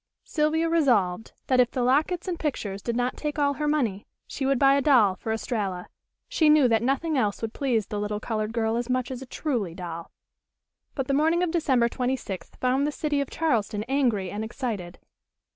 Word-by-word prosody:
Sylvia 315 +2 +1
resolved 225 - +1
that, 255 -1 +2
if 245 -1 +5
the 250 - -2
lockets 310 +8 +1
and 350 -2 -3
pictures 205 -10 -3
did 235 +2 -3
not 245 +1 0
take 300 0 -3
all 285 -1 +2
her 300 - +1
money, 235 -10 0 0.2
she 270 - -3
would 275 -1 +2
buy 275 +1 +5
a 280 - +3
doll 245 -9 +5
for 220 - -5
Estralla. 205 -6 -3 0.4
She 340 -12 +3
knew 300 -3 +6
that 225 -1 +3
nothing 275 +4 0
else 210 -2 -1
would 225 - -3
please 240 -7 0
the 205 +1 -4
little 210 0 -2
colored 215 -1 -2
girl 225 0 0
as 240 +1 -3
much 255 0 -1
as 255 0 -5
a 265 - -9
"truly" 235 - -2
doll. 170 -2 -7 0.9
But 270 - -1
the 275 - 0
morning 320 +5 +3
of 350 - 0
December 270 -8 +2
twenty 250 +2 -1
sixth 195 -7 -8
found 260 +3 +1
the - - -1
city 295 -1 -1
of 280 - -4
Charleston 220 -9 0
angry 235 -7 0
and 210 +2 -4
excited. 220 -7 -5
250 Hz, 205 wpm, -26 LUFS, 215-290 Hz, 0.9 s, knew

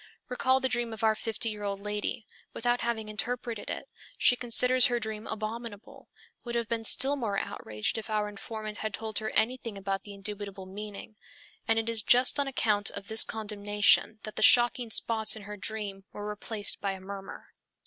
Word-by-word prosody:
Recall 260 +1 +2
the 260 - +1
dream 240 -2 -1
of 220 +1 -7
our 220 -1 +5
fifty 225 +1 -2
year 210 -1 -7
old 200 -1 -3
lady. 210 +1 -3 0.3
Without 240 +1 0
having 230 -2 -2
interpreted 230 +1 -3
it, - - -4 0.3
she 245 - +5
considers 250 +1 +6
her 240 -1 0
dream 220 -1 -5
abominable, 220 0 -6 0.3
would 240 -1 -5
have 235 -1 0
been 230 0 -2
still 270 +5 +4
more 220 -7 -2
outraged 105 - -2
if 225 - -9
our 210 -1 0
informant 215 +1 -6
had 215 -1 -3
told 220 -1 -2
her 220 0 -3
anything 230 -1 0
about 195 0 -2
the 205 -1 -10
indubitable 200 -1 -5
meaning; 205 +2 -8 0.5
and 225 - +3
it 225 0 0
is 230 -1 +1
just 250 +5 +5
on 280 - +1
account 210 -6 +2
of 200 0 -7
this 220 0 +7
condemnation 210 0 +2
that 215 -1 -7
the - - -1
shocking 240 +1 +5
spots 220 0 +1
in 215 - -9
her 210 +1 -7
dream 200 0 -4
were 205 0 -6
replaced 210 0 -3
by 195 -1 -1
a 190 - -8
murmur. 195 +1 -9
220 Hz, 190 wpm, -29 LUFS, 205-235 Hz, 0.5 s, this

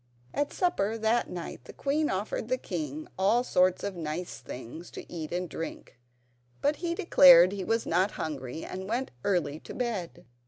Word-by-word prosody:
At 290 0 0
supper 225 - 0
that 225 +2 +1
night 170 -7 -7
the - - -10
queen 295 +2 0
offered 200 +3 -2
the 255 +1 +1
king 155 - -5
all 215 +6 +4
sorts 185 -6 +2
of 200 -2 -3
nice 165 +1 -4
things 130 +6 -8
to - - -9
eat 160 -3 -5
and 180 +1 -2
drink, 160 -5 -7 0.6
but 290 +1 +1
he 340 -1 -2
declared 265 - +8
he 200 -1 -4
was 225 +4 0
not 185 +4 +2
hungry, 145 -1 -5
and 190 +1 -6
went 245 +4 -1
early 160 -6 0
to - - -10
bed. 205 - -3
185 Hz, 170 wpm, -29 LUFS, 160-235 Hz, 0.6 s, declared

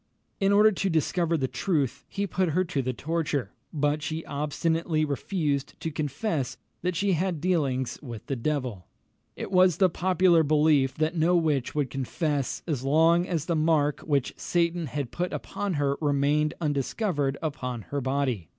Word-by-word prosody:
In 195 0 +3
order 210 +2 +6
to 195 0 -1
discover 165 +1 +1
the 135 -3 0
truth, 140 -5 -1
he 200 0 -2
put 185 -2 0
her 185 - +3
to 170 -6 -2
the 130 0 -1
torture; 150 -5 -2 0.2
but 150 0 0
she 155 +2 -4
obstinately 155 +2 0
refused 145 -1 -2
to 160 - -3
confess 145 - -2 0.2
that 180 0 -1
she 200 +4 +1
had 180 -1 0
dealings 140 -8 0
with 120 -6 -8
the 135 - -2
devil. 125 -7 -3 0.5
It - - -6
was 185 -3 +5
the 190 -3 +4
popular 180 -1 +3
belief 150 -3 +3
that 155 +2 0
no 170 +2 +3
witch 150 -7 +1
would 145 -4 0
confess 140 +1 -2
as 145 -6 -2
long 165 +5 +4
as 165 -4 -1
the 170 - 0
mark 155 -2 +2
which 140 -4 0
Satan 170 -1 0
had 140 -3 -4
put 180 +1 -2
upon 205 -2 -3
her 140 -1 +1
remained 145 +1 +2
undiscovered 145 - -1
upon 125 -7 -4
her 140 0 -3
body. 130 - -1
155 Hz, 165 wpm, -27 LUFS, 140-170 Hz, 0.5 s, order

